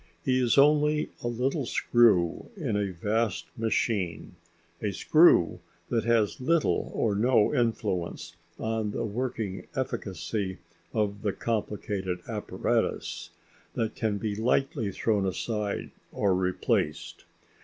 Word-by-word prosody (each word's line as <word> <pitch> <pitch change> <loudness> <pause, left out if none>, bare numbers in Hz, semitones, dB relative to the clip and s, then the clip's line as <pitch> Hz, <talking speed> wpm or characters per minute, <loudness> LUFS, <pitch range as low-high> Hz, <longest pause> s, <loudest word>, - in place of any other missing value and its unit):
He 130 0 +3
is 125 0 +2
only 150 +1 +4
a - - -1
little 125 +3 -1
screw 110 - +3
in 135 - -2
a 100 -1 0
vast 105 +4 -1
machine 105 -8 -1 0.5
a 105 - -1
screw 155 - +5 0.3
that 115 -2 0
has 115 -1 +2
little 165 +4 +1
or 110 - +1
no 110 +2 +3
influence 100 - -1 0.2
on 110 -1 -1
the 105 - -2
working 110 -3 -3
efficacy 100 - -3 0.3
of 105 -2 -1
the 100 -2 0
complicated 105 -4 -2
apparatus, - - -2 0.5
that 110 -1 -1
can 110 -4 -1
be 105 0 -2
lightly 115 -1 0
thrown 105 +1 0
aside 105 +2 -2 0.2
or 100 -2 +1
replaced. 90 -4 -1
110 Hz, 115 wpm, -28 LUFS, 100-120 Hz, 0.5 s, screw